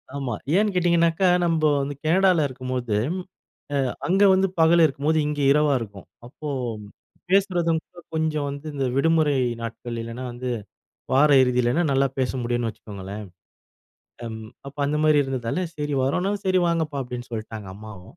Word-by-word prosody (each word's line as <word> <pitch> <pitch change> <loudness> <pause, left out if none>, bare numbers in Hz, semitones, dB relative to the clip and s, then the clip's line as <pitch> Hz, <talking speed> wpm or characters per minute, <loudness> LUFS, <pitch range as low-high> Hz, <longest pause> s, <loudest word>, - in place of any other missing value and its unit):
ஆமா. 135 -4 -3 0.2
ஏன்னு 205 0 +2
கேட்டீங்கன்னாகா, 170 0 +3 0.2
நம்ப 165 -2 +1 0.2
வந்து 140 +1 -4
கேனடால 180 0 +4
இருக்கும்போது 130 -4 -3 0.8
அ - - +2 0.3
அங்க 190 +3 +2
வந்து 190 +1 +3
பகல் 165 +1 +5
இருக்கும்போது 155 +1 +1
இங்கே 150 -1 -2
இரவா 150 0 +3
இருக்கும். 100 -4 -9 0.2
அப்போ 150 +5 -8 0.8
பேசுறதும் 175 -4 +2
கூட 175 - -15
கொஞ்சம் 155 -2 0
வந்து 140 +2 -7
இந்த 135 -2 -1
விடுமுறை 155 0 +3 0.2
நாட்களில் 115 0 -5
இல்லன்னா, 115 +3 -6
வந்து 125 +1 -4 0.6
வார 145 +3 +5
இறுதியிலனா 125 +4 +2
நல்லா 135 0 +3
பேச 130 -1 +1
முடியுன் 120 0 -1
வச்சுக்கோங்களேன். 105 -1 -8 1.0
அம் 110 -1 -6 0.3
அப்ப 140 - -10
அந்த 150 +1 0
மாரி 155 -1 +5
இருந்ததால 130 +3 -2 0.2
சரி 150 -1 -3
வரோன்னா 180 +9 0
சரி 185 -1 +3
வாங்கப்பா 160 -4 -1
அப்டின்னு 125 -1 -7
சொல்லிட்டாங்க 110 -3 -6
அம்மாவும். 105 - -12
140 Hz, 140 wpm, -24 LUFS, 120-165 Hz, 1.0 s, பகல்